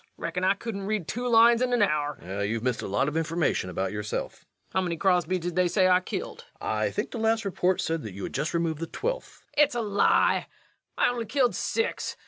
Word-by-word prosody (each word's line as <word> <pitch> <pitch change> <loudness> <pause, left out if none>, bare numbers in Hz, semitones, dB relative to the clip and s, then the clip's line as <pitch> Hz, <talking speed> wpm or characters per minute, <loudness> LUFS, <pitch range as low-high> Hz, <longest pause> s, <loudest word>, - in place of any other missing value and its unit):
Reckon 170 +2 -3
I 190 +2 +4
couldn't 200 -3 -5
read 210 -6 -1
two 245 +2 -3
lines 235 0 +6
in 245 -1 +2
a 205 - +6
hour. 150 -4 -1
REVENUE. 95 +3 -4
You've 115 0 -2
missed 125 -2 0
a - - -4
lot 100 +8 +1
of 150 - -3
information 160 - 0
about 95 +1 -2
yourself. 105 0 -3
LUKE. - - -29
How 190 - +2
many 175 -2 -2
Crosbys 185 0 +2
did 175 0 -4
they 180 0 +3
say 185 +1 +3
I 180 0 +5
killed? 470 - -6
REVENUE. - - -2
I - - +1
think - - -3
the 235 - -5
last 225 0 +1
report 185 -1 +1
said 165 -3 -2
you 100 -2 -7
had - - -5
just 150 +5 -2
removed 165 -2 0
the 165 - -3
twelfth. - - -4
LUKE. 295 - +7
It's 280 - 0
a 240 - 0
lie! 205 -2 +2 0.5
I - - +4
only 235 -2 -4
killed 250 +1 +2
six 455 +1 -2
185 Hz, 235 wpm, -27 LUFS, 155-230 Hz, 0.5 s, LUKE